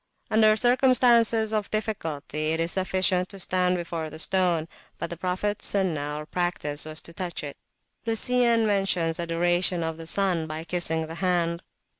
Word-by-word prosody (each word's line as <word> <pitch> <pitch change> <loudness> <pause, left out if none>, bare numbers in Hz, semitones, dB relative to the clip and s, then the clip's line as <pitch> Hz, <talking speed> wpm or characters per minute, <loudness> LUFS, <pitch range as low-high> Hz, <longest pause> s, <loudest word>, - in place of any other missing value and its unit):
Under 215 0 +5
circumstances 240 -2 +4
of 210 -2 -1
difficulty, 160 -8 -2
it 160 - -1
is 165 +1 0
sufficient 185 -1 +1
to 195 - -6
stand 180 0 +1
before 170 -2 -4
the 155 - -9
stone, 175 -2 +1 0.3
but 170 - -4
the - - -2
Prophets 185 +4 -2
Sunnat, 155 -7 -1
or 150 - -6
practice, 160 -4 -1
was 155 0 -5
to 170 - -9
touch 175 -3 -5
it. 145 -1 -6 0.5
Lucian 235 0 +2
mentions 185 -5 +1
adoration 175 +1 +1
of 160 0 -3
the 165 0 -8
sun 180 -3 +1
by 155 +1 -5
kissing 160 -1 0
the 160 - -8
hand. 170 -2 0
180 Hz, 160 wpm, -26 LUFS, 160-205 Hz, 0.5 s, Under